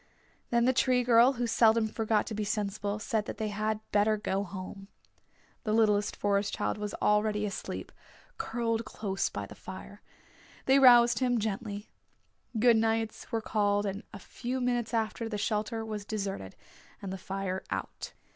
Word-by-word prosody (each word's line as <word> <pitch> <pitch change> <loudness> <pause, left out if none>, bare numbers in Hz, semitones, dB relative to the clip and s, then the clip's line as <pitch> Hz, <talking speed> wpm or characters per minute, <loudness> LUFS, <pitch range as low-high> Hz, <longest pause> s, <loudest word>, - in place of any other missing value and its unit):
Then 235 0 +3
the 260 - +4
Tree 250 -1 +3
Girl, 240 +2 +6
who 245 -1 -2
seldom 225 -1 +4
forgot 220 -1 0
to 225 - -5
be 215 0 -2
sensible, 205 0 -2
said 215 0 -1
they 215 0 -3
had 215 +1 -1
better 210 +1 +3
go 200 -1 -1
home. 195 +1 -8 0.8
The 215 - 0
littlest 210 -2 +3
Forest 200 0 0
Child - - -2
was 210 -1 -4
already 210 0 +2
asleep, 200 - -5 0.5
curled 230 - -1
close 200 -3 -2
by - - -5
the - - -11
fire. - - -10 0.6
They 270 +1 +5
roused 240 -3 +7
him 245 -2 +2
gently. 210 0 -3 0.7
Good 235 +1 +5
nights 225 +1 -1
were 225 -1 0
called 205 -1 +1
and 200 +1 -3
a 205 - -8
few 250 +5 -5
minutes 245 -2 0
after, 225 0 -1
the 210 - -3
shelter 215 +2 -1
was 215 -2 -4
deserted, 195 - -4 0.4
and 190 -1 -5
the - - -4
fire 190 0 -3
out. - - -5
215 Hz, 160 wpm, -30 LUFS, 205-230 Hz, 0.8 s, roused